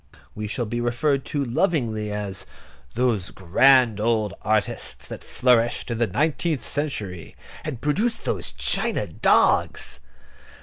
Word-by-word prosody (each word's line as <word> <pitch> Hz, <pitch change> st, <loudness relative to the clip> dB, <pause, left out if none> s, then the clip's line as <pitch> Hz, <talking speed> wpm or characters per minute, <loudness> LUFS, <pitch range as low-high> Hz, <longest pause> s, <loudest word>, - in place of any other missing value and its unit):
We 105 Hz, 0 st, -5 dB
shall 120 Hz, +3 st, -2 dB
be 120 Hz, +2 st, -3 dB
referred 135 Hz, +4 st, 0 dB
to 145 Hz, -3 st, -2 dB
lovingly 120 Hz, -, 0 dB
as 100 Hz, -3 st, -4 dB, 0.5 s
"those 115 Hz, -6 st, +1 dB
grand 115 Hz, +5 st, +4 dB
old 110 Hz, -3 st, +1 dB
artists 105 Hz, -2 st, -1 dB
that -, -, -8 dB
flourished 120 Hz, -1 st, +2 dB
in 115 Hz, -, -2 dB
the 120 Hz, -, +2 dB
nineteenth 150 Hz, -, 0 dB
century, 105 Hz, -, -4 dB, 0.3 s
and 145 Hz, -7 st, -5 dB
produced 215 Hz, +11 st, 0 dB
those -, -, -2 dB
china -, -, -1 dB
dogs." -, -, +2 dB
120 Hz, 125 wpm, -24 LUFS, 105-140 Hz, 0.5 s, grand